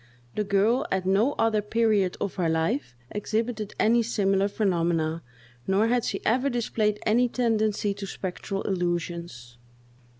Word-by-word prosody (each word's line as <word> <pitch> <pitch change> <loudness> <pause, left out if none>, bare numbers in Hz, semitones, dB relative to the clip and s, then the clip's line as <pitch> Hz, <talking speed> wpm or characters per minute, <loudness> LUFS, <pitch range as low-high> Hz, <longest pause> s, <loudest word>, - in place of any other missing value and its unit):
The 210 - -1
girl 210 +6 +2
at 190 -1 0
no 205 +9 +3
other 225 -2 +1
period 210 -3 +1
of 200 - -2
her 175 -4 0
life 155 -6 -1 0.2
exhibited 215 0 -2
any 235 +2 +4
similar 200 -3 +1
phenomena, 170 -5 0 0.5
nor 200 +4 +3
had 245 -1 +1
she - - -3
ever 255 +5 +2
displayed 220 -4 0
any 240 +3 +3
tendency 215 -4 +1
to 200 0 -7
spectral 195 +1 -4
illusions. 170 -9 -3
205 Hz, 135 wpm, -26 LUFS, 180-225 Hz, 0.5 s, any